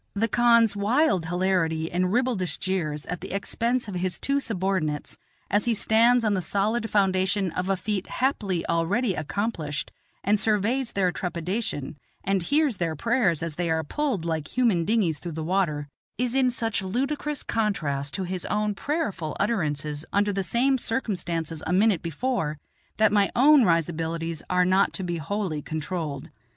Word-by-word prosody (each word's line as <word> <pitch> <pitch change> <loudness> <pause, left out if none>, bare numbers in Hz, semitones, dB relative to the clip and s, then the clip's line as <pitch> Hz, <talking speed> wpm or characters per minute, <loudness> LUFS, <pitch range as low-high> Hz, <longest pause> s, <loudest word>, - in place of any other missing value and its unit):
The 220 +3 +1
khan's 235 -2 +4
wild 200 - +2
hilarity 170 -3 0
and 180 +1 +1
ribaldish 210 -9 0
jeers 160 -5 -2
at 180 0 -5
the - - -7
expense 235 +4 -1
of 200 - -5
his 180 0 -1
two 280 0 +1
subordinates, 185 - -2 0.3
as 205 +1 +1
he 235 -1 +2
stands 230 +3 +4
on 210 - +2
the 190 - 0
solid 210 +6 0
foundation 190 -1 +2
of 180 +3 -3
a 195 - +2
feat 195 0 -2
happily 205 -10 -1
already 185 +7 +1
accomplished 155 -2 -3 0.3
and 210 +1 +2
surveys 225 +4 +1
their 185 -2 +2
trepidation, 175 - -3 0.3
and 195 0 +1
hears 285 - +2
their 165 -3 -1
prayers 200 - +1
as 165 -3 -5
they 175 -1 -1
are 160 0 +1
pulled 250 - -2
like 160 +3 -3
human 215 -10 +3
dinghies 185 -8 +1
through 170 -2 -6
the 160 0 -4
water, 155 -5 0 0.3
is 250 0 0
in 260 -1 +3
such 225 -3 -1
ludicrous 275 +8 -2
contrast 150 -11 -1
to 195 - -2
his 185 0 -3
own 210 0 0
prayerful 200 - -3
utterances 150 -8 -1
under 205 0 +2
the 195 - 0
same 255 +7 +1
circumstances 170 - -2
a - - -1
minute 195 -1 +3
before 165 - -2 0.4
that 220 -1 +4
my 205 -1 +3
own 280 +2 +7
risibilities 165 -1 -1
are 180 0 +3
not 190 +2 +3
to 190 - -4
be 175 -1 -2
wholly 165 -1 -2
controlled. 155 -2 -4
190 Hz, 165 wpm, -26 LUFS, 165-225 Hz, 0.4 s, own